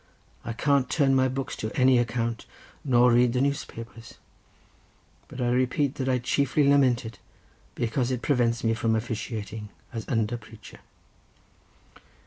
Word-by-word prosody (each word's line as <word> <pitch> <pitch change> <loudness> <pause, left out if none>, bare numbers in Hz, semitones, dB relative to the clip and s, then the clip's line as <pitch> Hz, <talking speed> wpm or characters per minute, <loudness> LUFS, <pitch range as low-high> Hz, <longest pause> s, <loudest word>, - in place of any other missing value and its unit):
I 115 - -4
can't 140 +1 +1
turn 140 -3 +2
my 130 0 +3
books 130 +1 -4
to 110 - -3
any 130 -1 +5
account, 115 -1 -2 0.4
nor 125 -2 +4
read 120 0 +4
the 125 - 0
newspapers; 115 -5 -4 1.1
but - - -10
I 120 -1 +1
repeat 130 +3 +1
that 130 - -1
I 130 - +2
chiefly 140 +3 +1
lament 130 -4 +3
it 110 - -9 0.6
because 120 +2 -1
it 125 -2 -3
prevents 120 -4 +1
me 115 -1 +2
from 115 0 0
officiating 110 -2 -5 0.2
as 115 -2 -6
under 115 -1 0
preacher." 110 -2 -14
120 Hz, 140 wpm, -26 LUFS, 115-130 Hz, 1.1 s, any